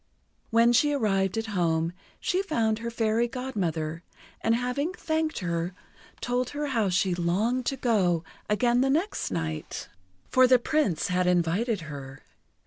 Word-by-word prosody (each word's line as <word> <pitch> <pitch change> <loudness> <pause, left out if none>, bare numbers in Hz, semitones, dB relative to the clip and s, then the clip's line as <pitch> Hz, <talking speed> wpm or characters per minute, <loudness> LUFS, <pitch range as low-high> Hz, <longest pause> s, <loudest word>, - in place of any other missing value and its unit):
When 230 +1 +4
she 290 +5 +4
arrived 195 -6 +1
at 225 - -1
home, 165 -2 +1 0.3
she 370 +1 0
found 230 - 0
her 235 0 -3
Fairy 230 0 +1
Godmother, 175 - -3 0.4
and 225 - +3
having 250 +8 -1
thanked 315 -2 -1
her, 170 0 -2 0.5
told 245 0 0
her 295 - -1
how 225 -6 +1
she 180 +1 +2
longed 205 +9 0
to 270 - 0
go 185 -10 +2 0.3
again 240 +3 +3
the 270 - +2
next 335 +9 0
night, 80 -4 -4 0.4
for 255 0 +5
the 255 0 +6
Prince 245 - 0
had 180 0 +1
invited 180 +5 +1
her. 140 -3 -9
225 Hz, 145 wpm, -27 LUFS, 175-250 Hz, 0.5 s, the